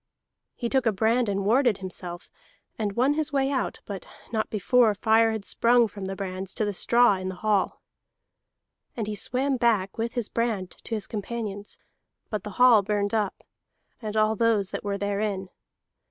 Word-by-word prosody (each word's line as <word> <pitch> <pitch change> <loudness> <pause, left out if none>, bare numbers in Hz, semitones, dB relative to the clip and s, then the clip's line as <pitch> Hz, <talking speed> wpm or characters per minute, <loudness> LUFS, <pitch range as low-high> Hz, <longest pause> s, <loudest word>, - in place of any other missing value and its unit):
He 240 - -3
took 260 0 +1
a - - +4
brand 225 +3 +1
and 200 -1 -1
warded 240 -1 +3
himself, 180 -1 -7 0.4
and 210 -2 -2
won 255 +6 +3
his 310 0 0
way 275 -1 +1
out, 265 - -2
but 200 -2 -6 0.3
not 220 -2 -1
before 220 +1 +3
fire 225 +2 +3
had 220 -3 -4
sprung 235 0 +4
from 205 -2 -8
the 195 0 -4
brands 190 -1 -5
to 215 - 0
the 205 - -2
straw 235 +1 +4
in 185 0 -4
the 185 - -5
hall. 205 0 0 1.1
And 225 - -1
he 210 - -3
swam 260 +5 0
back 225 -4 +1
with 230 +1 -2
his 240 -4 -1
brand 220 -6 -2
to 225 - -2
his 215 - -3
companions, 210 -1 -5 0.5
but 215 -2 -2
the - - -6
hall 245 -4 +7
burned 205 0 -1
up, 210 -3 -1 0.6
and 215 -1 -4
all 215 0 +3
those 215 -3 +1
that - - -4
were 200 -1 -2
therein. 200 -1 -2
215 Hz, 180 wpm, -26 LUFS, 200-235 Hz, 1.1 s, hall